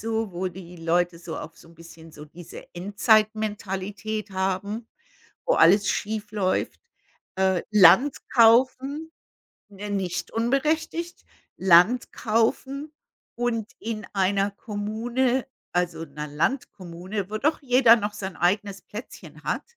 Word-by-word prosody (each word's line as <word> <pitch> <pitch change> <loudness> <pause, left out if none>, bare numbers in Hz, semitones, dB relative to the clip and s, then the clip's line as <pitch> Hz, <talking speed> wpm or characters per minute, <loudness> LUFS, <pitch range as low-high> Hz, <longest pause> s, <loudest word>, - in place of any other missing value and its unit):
so, 225 -2 -2
wo 180 +2 -2
die 180 0 -11
Leute 170 +1 0
so 170 -1 -7
auf 165 - -9
so - - -17
'n 165 - -18
bisschen 165 0 -14
so 150 -1 -11
diese 165 +3 -12
Endzeitmentalität 210 0 0
haben, 195 +4 -2 0.6
wo - - +3
alles 200 +5 +5
schiefläuft. 210 -2 -2 0.6
Äh, 190 -2 +1
Land 210 +8 +6
kaufen, 260 +6 +3 0.6
ne, 205 +1 -8
nicht 190 -3 -3
unberechtigt, 310 +8 -1 0.3
Land 190 +7 +4
kaufen 265 +6 -1 0.4
und 230 -2 -2
in 215 -2 -5
einer 195 +1 +1
Kommune 235 +5 -2 0.3
also 175 -2 -1
'ner 150 0 -7
Landkommune, 185 - -3
wo 215 - -2
doch 305 +6 +1
jeder 245 -3 +6
noch 205 -2 -3
sein 195 -2 -6
eigenes 200 +2 0
Plätzchen 215 +4 -10
hat. - - -1
205 Hz, 120 wpm, -25 LUFS, 180-230 Hz, 0.6 s, Land